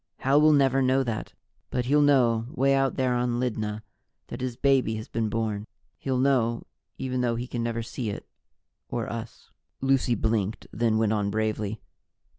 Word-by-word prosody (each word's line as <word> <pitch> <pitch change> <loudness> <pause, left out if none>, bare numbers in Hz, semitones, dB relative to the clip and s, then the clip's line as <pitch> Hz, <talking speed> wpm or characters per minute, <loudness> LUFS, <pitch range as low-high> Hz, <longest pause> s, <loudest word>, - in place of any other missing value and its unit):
Hal 140 +3 +4
will 155 0 +6
never 135 -2 +4
know 130 +1 +3
that, 115 -4 -4 0.4
but 125 -1 -1
he'll 145 +3 +4
know, 120 -6 +3
way 135 +1 +2
out 135 -1 +2
there 130 -2 +1
on 120 -1 0
Lydna, 110 -3 -2 0.5
that - - -6
his 125 -2 -3
baby 135 -5 +2
has 110 0 -6
been 115 -2 -1
born. 110 -1 -2 0.3
He'll 130 -2 -1
know, 125 -3 +2 0.3
even 130 -1 -2
though 120 -1 +1
he 120 +2 -3
can 120 -1 -4
never 115 0 -2
see 115 0 -4
it 100 - -6 0.6
or 120 -2 -2
us." 115 -1 -7 0.3
Lucy 135 -2 +2
blinked, 110 -2 -1
then 115 -1 +1
went 110 -1 +2
on 105 -2 0
bravely. 110 0 -2
120 Hz, 175 wpm, -26 LUFS, 110-130 Hz, 0.6 s, will